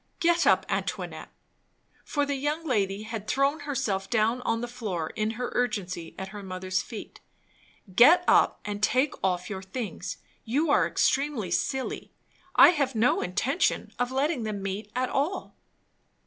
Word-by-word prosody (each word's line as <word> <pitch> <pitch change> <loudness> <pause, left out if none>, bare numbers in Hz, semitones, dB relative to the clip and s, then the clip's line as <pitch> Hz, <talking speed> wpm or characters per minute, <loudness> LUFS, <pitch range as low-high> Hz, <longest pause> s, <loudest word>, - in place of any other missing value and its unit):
"Get 340 0 +3
up, - - +4
Antoinette" - - -3 0.7
for 290 -1 0
the 285 - -1
young 295 +4 -2
lady 205 -6 0
had 215 -1 -6
thrown 275 +5 +1
herself 230 -10 -2
down 230 +2 +1
on 230 -2 0
the 240 - -3
floor 210 -10 -4
in 215 0 -1
her 250 0 -3
urgency, 185 -8 -2
at 190 0 -5
her 205 0 -8
mother's 185 -1 -2
feet. 225 -3 -9 0.8
"Get 315 - +7
up, - - +4
and 205 0 -4
take 255 +6 +2
off 180 -2 0
your 190 -2 -5
things; 190 -2 -5 0.3
you 285 +7 +1
are - - +4
extremely 275 -10 0
silly. 265 +8 -2 0.4
I - - +9
have 280 -7 0
no 225 +3 +3
intention 235 - 0
of 245 0 0
letting 275 +1 0
them 210 -3 -4
meet 200 +2 -4
at 255 0 0
all." 305 +8 -2
230 Hz, 155 wpm, -27 LUFS, 195-275 Hz, 0.8 s, I